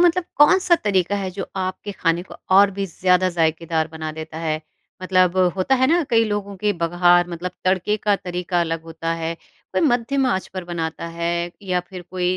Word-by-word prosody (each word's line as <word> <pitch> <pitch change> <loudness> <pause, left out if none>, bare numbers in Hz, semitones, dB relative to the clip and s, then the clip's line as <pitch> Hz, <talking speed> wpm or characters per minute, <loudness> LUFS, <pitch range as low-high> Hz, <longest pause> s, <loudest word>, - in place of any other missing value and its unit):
मतलब 350 0 +4
कौन-सा 350 +4 +5
तरीक़ा 200 -1 +1
है 195 -2 -3
जो 190 +1 -5
आपके 185 +2 -3
ख़ाने 170 -2 0
को 185 - -13 0.2
और 200 0 +7
भी 195 0 -3
ज़्यादा 180 +1 +2
ज़ायकेदार 160 -1 0
बना 155 -1 -5
देता 160 0 -7
है? 155 -1 -2 0.4
मतलब 185 -1 +2 0.2
होता 190 +8 +2
है 260 0 +3
ना 335 +5 +3
कई 230 -1 +4
लोगों 205 -2 -3
के 210 +2 0
बगार 175 0 +3
मतलब 175 +1 -4
तड़के 185 +3 +1
का 210 -1 +1
तरीक़ा 180 -1 -2
अलग 165 -1 -2
होता 165 0 -4
है। 165 0 -3 0.4
कोई - - +1
मध्यम 270 -1 +2
आँच 190 -7 0
पर 185 -1 -4
बनाता 170 -1 -4
है 170 +1 -1
या 180 -2 0
फ़िर 185 -2 -8
कोई 180 0 0
180 Hz, 190 wpm, -21 LUFS, 170-205 Hz, 0.4 s, और